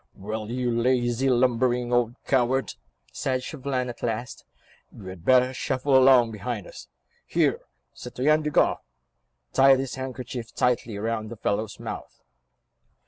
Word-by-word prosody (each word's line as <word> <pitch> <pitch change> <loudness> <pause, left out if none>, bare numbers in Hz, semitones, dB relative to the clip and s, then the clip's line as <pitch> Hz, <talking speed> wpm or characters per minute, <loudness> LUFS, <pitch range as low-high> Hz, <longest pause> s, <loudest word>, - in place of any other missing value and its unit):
"Well, 110 +2 -5
you 125 0 -1
lazy, 125 +1 +1
lumbering 125 0 +1
old 120 -1 +1
coward," 130 0 +1 0.4
said 130 -1 -2
Chauvelin 130 -4 -3
at 120 -1 -8
last, 120 +1 -4 0.5
"you 105 - -13
had 95 -3 -9
better 130 +2 +4
shuffle 130 +1 0
along 130 -3 +6
behind 110 -2 -5
us. - - -11 0.4
Here, - - +1 0.3
Citoyen 155 +4 0
Desgas, 150 -1 +2 0.8
tie 135 0 +6
this 130 -1 -3
handkerchief 125 -3 -6
tightly 120 -3 0
round 110 0 -3
the 120 - -8
fellow's 105 +1 -2
mouth." - - -8
125 Hz, 130 wpm, -25 LUFS, 115-130 Hz, 0.8 s, along